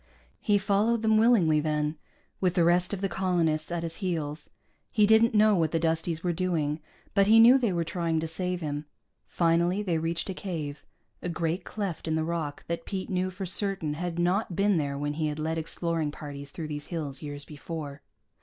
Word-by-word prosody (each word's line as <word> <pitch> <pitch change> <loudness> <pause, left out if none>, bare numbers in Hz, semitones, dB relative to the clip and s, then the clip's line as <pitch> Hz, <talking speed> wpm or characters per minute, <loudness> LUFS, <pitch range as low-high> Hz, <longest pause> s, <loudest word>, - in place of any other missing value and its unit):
He 205 -1 +3
followed 205 +3 +1
them 220 -1 +4
willingly, 195 -10 +4
then, 150 0 0 0.4
with 180 -2 +1
the 175 - +4
rest 175 +1 +3
of 200 -2 -3
the 195 - +1
colonists 170 -4 0
at 170 -1 -2
his 165 0 -5
heels. 160 -6 -3 0.4
He 210 -2 +4
didn't 220 +2 +5
know 215 0 +6
what 165 -3 +2
the 165 - 0
Dusties 165 0 -1
were 175 -1 +1
doing, 160 -4 -1 0.3
but 200 -1 +4
he 225 +1 +7
knew 245 +4 +8
they 235 -6 +1
were 170 -2 0
trying 165 -1 -1
to 160 - -2
save 180 +2 -3
him. 145 -1 -3 0.4
Finally 170 +4 +2
they 170 -5 0
reached 165 +1 -1
a - - -4
cave, 160 -7 -5 0.4
a 180 - -3
great 170 +1 -1
cleft 195 -7 -4
in 160 - +1
the 160 - +1
rock 160 -3 -3
that 170 0 -3
Pete 190 -1 -4
knew 185 0 0
for 190 +1 -6
certain 190 -4 -2
had 170 +2 -4
not 180 +2 +1
been 200 0 +3
there 140 -2 -1
when 145 +1 -2
he 155 0 -1
had 150 0 -3
led 160 +1 -1
exploring 165 -1 -2
parties 145 -1 -8
through 155 +1 -6
these 145 -1 -5
hills 150 -6 -5
years 145 -1 -5
before. 150 -1 -7
170 Hz, 200 wpm, -28 LUFS, 155-190 Hz, 0.4 s, knew